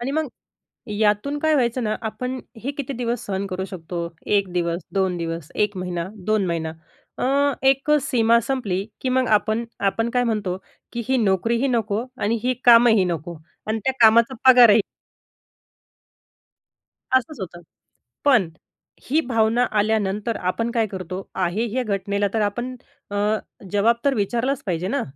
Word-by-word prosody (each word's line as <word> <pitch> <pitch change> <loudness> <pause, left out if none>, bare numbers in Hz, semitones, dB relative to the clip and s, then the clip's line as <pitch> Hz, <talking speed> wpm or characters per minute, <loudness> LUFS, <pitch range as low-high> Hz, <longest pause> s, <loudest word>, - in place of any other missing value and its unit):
आणि 245 +3 -2
मग 310 0 -1 0.6
यातून 210 +7 +1
काय 315 +1 +2
व्हायचं 245 -2 +1
ना, 215 - 0
आपण 250 +4 -4 0.3
हे 275 - -1
किती 280 -1 -5
दिवस 240 -1 -3
सहन 195 0 -2
करू 190 -1 -4
शकतो? 170 -2 -5 0.2
1 200 -2 +2
दिवस, 170 -1 -1
2 190 -2 +1
दिवस, 165 -2 -5
एक 210 -2 0
महिना, 180 -1 -3 0.2
दोन 215 -3 +2
महिना 165 -2 -2 0.5
अ, - - -1 0.4
एक 275 +2 +2
सीमा 235 -3 +3
संपली 205 -8 -1 0.2
की 260 - -2
मग 255 0 +1
आपण 215 +3 -1 0.2
आपण 225 +4 -1
काय 245 0 +1
म्हणतो 210 -6 -1 0.4
की 235 - -3
ही 265 - +3
नोकरीही 230 +5 +1
नको 225 -2 0 0.2
आणि 220 +3 +1
ही 255 +1 +1
कामंही 230 -4 +7
नको 170 0 -4 0.3
आणि 220 +1 -1
त्या 265 - +2
कामाचा 230 +3 +6 0.2
पगारही 235 -4 +7 2.3
असंच 260 +2 +1
होतं. 175 -2 -7 0.6
पण 245 - +4 0.6
ही 305 - +3
भावना 230 -2 +2 0.2
आल्यानंतर 210 +1 0
आपण 230 +6 -2
काय 230 -2 +1
करतो? 185 0 -7
आहे 190 +5 0
ह्या 255 +3 0
घटनेला 200 -1 -1
तर 220 - +1
आपण 240 +5 -2 0.4
अ, 205 - -3 0.6
जवाब 215 +3 +3
तर 280 - +4
विचारलाच 240 +5 -1
पाहिजे 180 -1 -2
ना? 280 +6 0
220 Hz, 150 wpm, -22 LUFS, 190-245 Hz, 2.3 s, कामंही